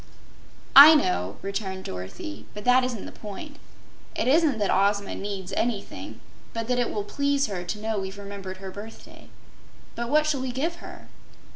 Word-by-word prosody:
"I 300 +3 +12
know," 100 - 0
returned 195 -1 -4
Dorothy, 95 +2 -7
"but 210 - -7
that 250 +1 +5
isn't 245 -5 -3
the - - -8
point. 285 +9 -9 0.6
It - - -1
isn't 295 -2 +4
that 205 -2 0
Ozma 200 +1 +1
NEEDS 195 -2 -5
anything, 225 -1 -3 0.3
but 230 -1 -3
that 250 0 +1
it 245 - +1
will 205 - -3
please 280 +5 0
her 190 -6 -4
to 190 +4 -4
know 220 -1 -2
we've 190 +1 -6
remembered 200 -2 -7
her 190 0 -8
birthday. 210 +3 -11 0.6
But 235 0 -4
what 305 +2 +4
shall 295 -4 0
we 260 -1 -3
give 320 +7 -2
her?" - - -11
210 Hz, 170 wpm, -26 LUFS, 195-260 Hz, 0.6 s, I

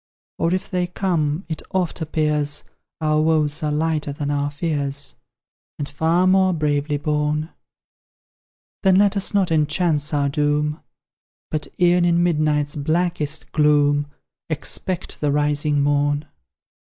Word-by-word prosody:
Or 165 - +1
if 185 +1 -1
they 180 -1 -1
come, 175 -3 -1
it 160 -2 -4
oft 180 -2 -1
appears, 150 -2 0 0.4
Our 155 0 +2
woes 155 -1 +2
are 150 -1 0
lighter 155 -1 0
than 145 0 -3
our 145 0 0
fears, 145 -2 -2 0.6
And 145 - -3
far 160 +5 +1
more 185 0 +4
bravely 150 -2 0
borne. 150 +1 -1 1.3
Then 190 -2 +4
let 200 +1 +4
us 200 +1 0
not 190 -4 +2
enhance 155 -1 +1
our 145 -2 +1
doom 150 +1 0 0.7
But 155 -1 -2
e'en 175 0 +4
in 175 0 +3
midnight's 150 -3 +1
blackest 155 0 -1
gloom 145 -1 +3 0.4
Expect 170 +3 -4
the 145 -1 +1
rising 145 0 +1
morn. 145 +1 +1
150 Hz, 130 wpm, -21 LUFS, 145-170 Hz, 1.3 s, more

